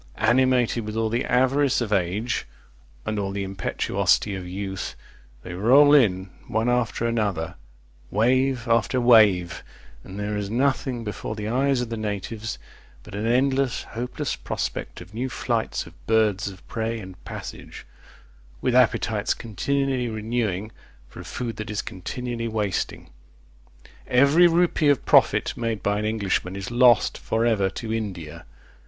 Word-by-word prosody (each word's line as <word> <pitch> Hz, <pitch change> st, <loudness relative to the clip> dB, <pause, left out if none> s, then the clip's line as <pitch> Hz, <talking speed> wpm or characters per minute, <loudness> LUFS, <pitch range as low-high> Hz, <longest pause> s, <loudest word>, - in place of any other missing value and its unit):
Animated 120 Hz, 0 st, +2 dB
with 110 Hz, 0 st, -6 dB
all 110 Hz, 0 st, 0 dB
the 120 Hz, +3 st, -1 dB
avarice 130 Hz, +2 st, +2 dB
of 110 Hz, -4 st, -1 dB
age, 100 Hz, +5 st, -1 dB, 0.6 s
and 105 Hz, -1 st, -2 dB
all 100 Hz, -1 st, -2 dB
the 100 Hz, 0 st, -3 dB
impetuosity 95 Hz, +1 st, 0 dB
of 95 Hz, -2 st, -6 dB
youth, 95 Hz, +1 st, -5 dB, 0.5 s
they 90 Hz, -, -7 dB
roll 130 Hz, +10 st, +6 dB
in 95 Hz, -9 st, +3 dB, 0.2 s
one 110 Hz, +2 st, 0 dB
after 120 Hz, -1 st, 0 dB
another; 100 Hz, -8 st, -1 dB, 0.6 s
wave 125 Hz, +3 st, +1 dB
after 115 Hz, +2 st, +2 dB
wave; 105 Hz, -8 st, +4 dB, 0.4 s
and 95 Hz, +2 st, -9 dB
there 105 Hz, +1 st, -2 dB
is 100 Hz, -1 st, -3 dB
nothing 130 Hz, 0 st, 0 dB
before 105 Hz, 0 st, -5 dB
the 105 Hz, -1 st, -4 dB
eyes 130 Hz, +2 st, +1 dB
of 120 Hz, -, -4 dB
the 115 Hz, -, -4 dB
natives 105 Hz, +1 st, -4 dB, 0.5 s
but -, -, -13 dB
an 105 Hz, +2 st, -2 dB
endless, 130 Hz, +1 st, +1 dB
hopeless 120 Hz, +2 st, -4 dB
prospect -, -, -4 dB
of 90 Hz, +3 st, -13 dB
new 125 Hz, +4 st, -3 dB
flights -, -, -2 dB
of -, -, -17 dB
birds 110 Hz, -2 st, +2 dB
of 95 Hz, -2 st, -10 dB
prey 115 Hz, 0 st, -2 dB
and 95 Hz, -3 st, -11 dB
passage, -, -, -8 dB, 0.7 s
with 125 Hz, -, 0 dB
appetites 115 Hz, -3 st, +2 dB
continually 130 Hz, +3 st, -1 dB
renewing 110 Hz, -2 st, -2 dB, 0.4 s
for -, -, -13 dB
a -, -, -7 dB
food 120 Hz, -2 st, -5 dB
that 110 Hz, 0 st, -6 dB
is 105 Hz, 0 st, -2 dB
continually 115 Hz, +5 st, -5 dB
wasting. 105 Hz, -4 st, -3 dB, 1.0 s
Every 140 Hz, +7 st, +5 dB
rupee 170 Hz, -3 st, +2 dB
of 145 Hz, -, +2 dB
profit -, -, +4 dB
made 115 Hz, -4 st, -3 dB
by 105 Hz, 0 st, +1 dB
an 105 Hz, -, -2 dB
Englishman 100 Hz, -4 st, -1 dB
is 100 Hz, +3 st, -5 dB
lost 120 Hz, -2 st, +4 dB
for 115 Hz, +1 st, 0 dB
ever 105 Hz, -5 st, +2 dB
to 110 Hz, +3 st, -5 dB
India. 85 Hz, -8 st, -5 dB
110 Hz, 150 wpm, -24 LUFS, 100-125 Hz, 1.0 s, roll